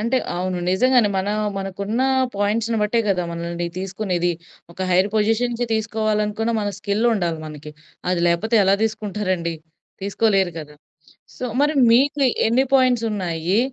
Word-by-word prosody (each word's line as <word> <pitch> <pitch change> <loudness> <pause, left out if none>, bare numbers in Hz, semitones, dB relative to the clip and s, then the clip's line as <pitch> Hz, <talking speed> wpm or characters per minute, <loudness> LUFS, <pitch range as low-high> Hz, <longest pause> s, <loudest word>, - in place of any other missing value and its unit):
అంటే 235 +4 0 0.2
అవును. 180 +1 -2
నిజంగానే 245 +3 +4
మన 190 +2 -2 0.3
మనకున్న 200 +5 -2 0.3
పాయింట్స్‌ని 220 +3 0
బట్టే 225 +3 +1
గదా! 185 -2 +1
మనల్ని 170 +1 -4
తీసుకునేది. 185 -2 -1 0.4
ఒక 170 - -22
హైర్ 185 +2 +3
పొజిషన్‌కి 230 +3 +1
తీసుకోవాలనుకున్న 215 0 -1
మన 205 - -1
స్కిలుండాలి 200 -5 0
మనకి. 150 0 -9 0.4
అది 180 -1 0
లేకపోతే 205 +7 +1
ఎలా 195 +1 +4
తీసుకుంటారండి. 195 -6 -2 0.5
తీసుకోలేరు 195 -2 +1
కదా! 150 -1 -11 0.6
సో, - - -5 0.2
మరి 295 +2 +2 0.2
మీకు 275 +5 +3 0.3
ఎన్ని 240 +4 +3
పాయింట్సున్నాయి? 210 -9 +1
205 Hz, 120 wpm, -21 LUFS, 180-225 Hz, 0.6 s, నిజంగానే